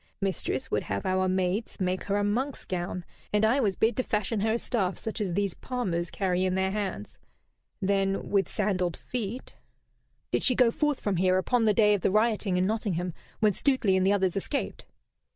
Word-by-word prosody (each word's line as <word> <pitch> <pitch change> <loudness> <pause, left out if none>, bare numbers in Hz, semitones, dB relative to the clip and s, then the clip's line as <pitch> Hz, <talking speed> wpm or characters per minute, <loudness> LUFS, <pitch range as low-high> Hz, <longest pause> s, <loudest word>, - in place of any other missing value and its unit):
Mistress 190 -9 -2
would 105 - +1
have 100 -1 -3
our 185 0 +1
maids 185 +5 -1
make 185 0 -1
her 200 0 0
a 205 - +1
monk's 250 +7 -1
gown, 180 -1 -3 0.3
and 210 +1 +3
I 240 +6 +3
was 205 -7 +1
bid 225 0 +2
to - - +3
fashion 210 0 -1
her 220 +2 +1
a - - +2
staff 195 -6 -1
such 220 0 -4
as 190 -4 -1
these 200 -1 0
palmers 180 -9 -2
carry 185 -1 0
in 185 0 +1
their 190 0 +1
hands. 195 - -4 0.6
Then 195 0 0
with 200 -1 +2
sandalled 185 -4 0
feet 240 0 -5 0.4
" - - -45
"Did - - +1
she 255 - +3
go 245 -2 +5
forth 295 +1 0
from 200 -3 -1
here 185 +1 +3
upon 230 +5 +2
the 215 - +4
day 210 -1 +5
of 205 - 0
the - - +2
rioting 215 -2 +2
in 180 - +2
Nottingham, 185 -5 -1 0.3
when 210 -2 +4
Stuteley 245 -5 +2
and 185 - +2
the 195 - +4
others 190 -3 +1
escaped?" 275 +8 -3
200 Hz, 205 wpm, -28 LUFS, 185-220 Hz, 0.6 s, go